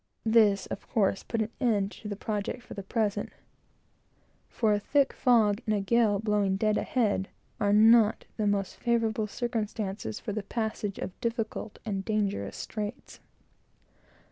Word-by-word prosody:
This, 215 -3 +4
of - - -7
course, 200 -5 +1
put 230 -1 -2
an 220 - -7
end 210 -6 +1
to 215 - -9
the 205 - -3
project, 210 +4 -3
for - - -10
the 200 - -5
present; 205 0 -1 1.2
for 220 -3 +1
a 205 - +1
thick 280 +6 +2
fog 225 -4 +3
and 215 - +2
a - - +1
gale 215 0 +3
blowing 205 -2 +1
dead 215 +2 +1
ahead 210 -7 0 0.3
are 205 - +2
not 220 +1 +5
the 215 -2 0
most 200 -1 -1
favorable 225 -2 0
circumstances 210 - -3
for 210 - -5
the 215 - -2
passage 215 -1 -3
of 185 - -7
difficult 230 -3 -3
and 195 -3 -2
dangerous 200 - -1
straits. 215 +3 -6
215 Hz, 150 wpm, -29 LUFS, 200-225 Hz, 1.2 s, not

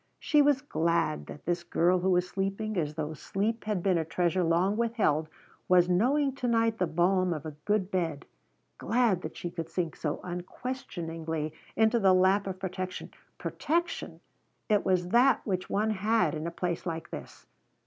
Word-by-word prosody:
She 300 -2 +3
was 285 -2 +3
glad 165 - 0
that - - -10
this 175 0 -1
girl 175 +1 +2
who 185 +2 +1
was 180 0 +2
sleeping 195 +3 -2
as 155 -4 -1
though 155 0 -3
sleep 215 +8 -2
had 210 -5 -1
been 185 -4 +3
a - - 0
treasure 175 +2 0
long 175 +5 +2
withheld, 215 -10 +1 0.4
was 180 -1 +5
knowing 265 +10 +2
to 250 - -2
night 230 -1 +2
the 180 - +2
balm 180 +3 +2
of 155 0 -7
a 155 - -5
good 205 -2 +1
bed, 165 -6 -1 0.5
glad 225 -5 +2
that 155 - -7
she 175 - -5
could 165 -2 -5
sink 170 -1 -2
so 150 -2 -3
unquestioningly 165 - -5 0.2
into 225 +1 +3
the 190 -3 +5
lap 190 +2 +3
of 190 -1 -4
protection. 185 -1 -5 0.3
Protection! 340 +2 -2 0.5
it 210 -2 +3
was 180 -2 +1
that 250 +6 +4
which 185 -3 -2
one 215 +2 +1
had 215 +2 +1
in 155 +1 -3
a - - -1
place 175 +1 -3
like 165 -1 -4
this. - - -9
185 Hz, 175 wpm, -29 LUFS, 170-215 Hz, 0.5 s, was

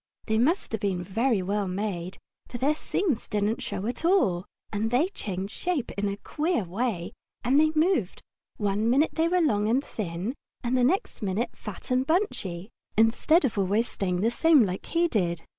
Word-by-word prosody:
They 220 -1 +1
must 320 +11 +1
have 220 - -2
been 185 -3 -1
very 220 +2 +1
well 200 +1 -1
made, 185 -2 -3 0.3
for 245 - -6
their 275 +5 +2
seams 310 - -1
didn't 210 +2 0
show 190 - -4
at 245 +6 -3
all, 205 - +3 0.3
and 215 +2 0
they 265 +10 +2
changed 195 - -5
shape 345 -8 -2
in 205 0 -1
a 200 - -4
queer 310 - -1
way 190 -1 -2 0.3
when 255 +4 +3
they 310 0 +4
moved; 310 - +1 0.3
one 205 +2 0
minute 280 +6 +3
they 325 +1 +2
were 360 +1 +2
long 210 -9 +2
and 260 +5 +2
thin 190 +2 -4 0.3
and 245 +1 0
the 250 - +3
next 345 +11 0
minute 215 +4 -1
fat 210 +3 -8
and 255 +1 +2
bunchy, 220 - -1 0.3
instead 250 +9 +4
of 220 -5 -1
always 205 +5 +2
staying 180 -2 -2
the 225 +3 +2
same 300 -1 +5
like 185 0 -4
he 340 +1 +2
did. 175 - -1
225 Hz, 185 wpm, -27 LUFS, 195-285 Hz, 0.3 s, same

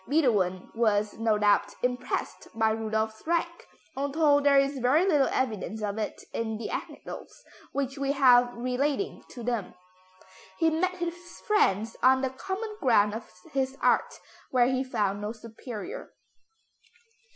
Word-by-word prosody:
Beethoven 210 - +1
was, 215 -2 +1
no 225 -2 +2
doubt, 205 -1 +2
impressed 250 0 -2
by 220 -1 +2
Rudolph's 220 0 -2
rank, 340 0 -1 0.3
although 285 +2 +3
there 285 -1 +4
is 275 0 +2
very 270 +8 +3
little 295 -8 +3
evidence 220 -3 -2
of 205 +1 -2
it 215 - -4
in 220 -1 -2
the 230 - -5
anecdotes - - -7 0.3
which 275 0 -3
we 275 0 0
have 250 -3 +5
relating 270 +9 -1
to 240 - -9
them. 230 -6 -2 0.8
He 325 0 +3
met 365 +4 0
his 345 -1 -2 0.3
friends 225 - +2
on 260 +1 +5
the 265 -1 -1
common 390 - -5
ground 210 -6 +4
of 225 +1 -7 0.2
his 265 0 -1
art, - - +2 0.3
where 250 -2 +4
he 260 0 0
found 205 -6 -1
no 210 +2 -3
superior. 230 - -8
250 Hz, 140 wpm, -28 LUFS, 220-285 Hz, 0.8 s, have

